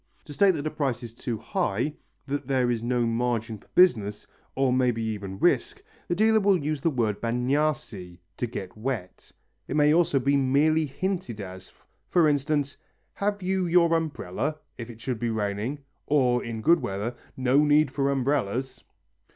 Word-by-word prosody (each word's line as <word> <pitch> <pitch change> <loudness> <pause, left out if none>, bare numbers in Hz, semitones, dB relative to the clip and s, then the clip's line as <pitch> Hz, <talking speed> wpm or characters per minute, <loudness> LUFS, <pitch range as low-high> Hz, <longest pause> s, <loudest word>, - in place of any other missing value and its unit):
To 145 - -9
state 190 +4 +4
that 145 -1 -4
a 155 - -1
price 135 -6 -2
is 115 -1 -8
too 115 -1 -4
high, 115 +8 -1 0.3
that 140 -1 -3
there 130 -3 +2
is 115 -2 -1
no 120 0 0
margin 115 -1 -1
for - - -24
business, 110 - +3 0.3
or 135 -1 +2
maybe 125 -3 +1
even 100 -3 -4
risk, 415 - +1 0.2
the 175 - 0
dealer 220 +3 +4
will 200 -2 +4
use 150 -2 -3
the 165 - +2
word 115 -8 -1
bagnarsi 125 -7 -1 0.2
(to 120 - -1
get 95 -5 -7
wet). 110 -5 -5 0.4
It - - -3
may 150 0 +5
also 165 -4 +3
be 140 +2 +2
merely 145 +4 +3
hinted 175 - -3
as, 95 -1 -8 0.4
for 170 -3 +4
instance, 145 -1 0 0.4
"Have 205 -1 -2
you 185 -1 0
your 170 -1 +4
umbrella?" 150 - -2 0.2
if 115 -1 -8
it 115 -2 -11
should 120 0 -3
be 120 0 -1
raining, 110 +4 -2 0.3
or 125 -4 +2
in 115 -1 -5
good 170 +6 +5
weather, 105 +5 -3 0.2
"No 130 +2 +3
need 150 -1 +4
for 140 0 0
umbrellas." 130 -2 -1
130 Hz, 170 wpm, -26 LUFS, 115-155 Hz, 0.4 s, may